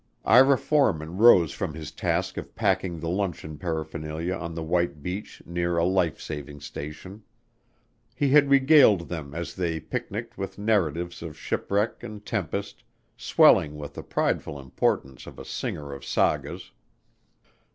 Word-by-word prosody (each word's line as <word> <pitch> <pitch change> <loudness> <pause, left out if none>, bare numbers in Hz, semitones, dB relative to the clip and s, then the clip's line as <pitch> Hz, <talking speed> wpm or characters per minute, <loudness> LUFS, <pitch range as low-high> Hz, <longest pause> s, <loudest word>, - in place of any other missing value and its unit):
Ira 130 +5 +6
Forman 90 - +1
rose 95 -8 +6
from 85 -1 -4
his 75 -2 -7
task - - -1
of - - -7
packing 95 -5 0
the 80 - -5
luncheon 85 -4 -3
paraphernalia 80 0 -3
on 85 -3 -5
the 80 - -4
white 85 -2 -1
beach 95 +4 -6
near 85 0 -1
a 85 - +3
life 90 -4 +1
saving 75 -1 -7
station. 75 +8 -8 0.9
He 140 +2 +1
had 145 0 +5
regaled 135 - +5
them 75 -4 -6
as 85 -4 -4
they 85 -3 -2
picniced 115 +5 -5
with 95 - -5
narratives 90 -5 0
of 80 -3 -7
shipwreck 105 +3 -1
and 105 -1 -9
tempest, 95 -9 -3 0.3
swelling 75 -1 +4
with 75 -1 -7
the - - -7
prideful 70 - -1
importance 65 0 -2
of - - -11
a - - -9
singer 70 -2 -5
of 70 - -9
sagas. - - -1
85 Hz, 145 wpm, -26 LUFS, 80-105 Hz, 0.9 s, Ira